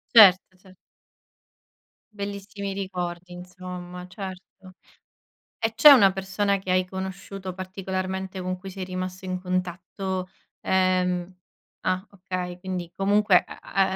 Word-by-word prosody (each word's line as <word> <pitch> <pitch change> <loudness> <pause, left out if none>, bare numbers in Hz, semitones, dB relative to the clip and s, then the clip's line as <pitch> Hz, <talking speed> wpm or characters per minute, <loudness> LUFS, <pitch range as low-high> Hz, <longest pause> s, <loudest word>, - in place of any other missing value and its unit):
Certo, 190 -3 +8
cer 185 0 -18 1.4
Bellissimi 200 0 -5
ricordi, 180 -2 -4
insomma. 180 0 -8
Certo. 190 -1 -9 0.9
E 225 0 -1
c'è 300 - +10
una 205 -9 +8
persona 195 +1 0
che 190 -1 -6
hai 185 0 +3
conosciuto 190 0 -6
particolarmente 190 0 -4
con 185 0 -2
cui 190 +1 -8
sei 190 0 -5
rimasto 185 0 -5
in 185 0 -3
contatto, 185 +1 -3 0.3
ehm 185 -1 +1 0.5
ah, 185 +2 0
okay. 180 -2 -5
Quindi 180 -2 -4
comunque 200 -1 +4
a - - -10
a 190 0 +1
185 Hz, 115 wpm, -26 LUFS, 180-195 Hz, 1.4 s, c'è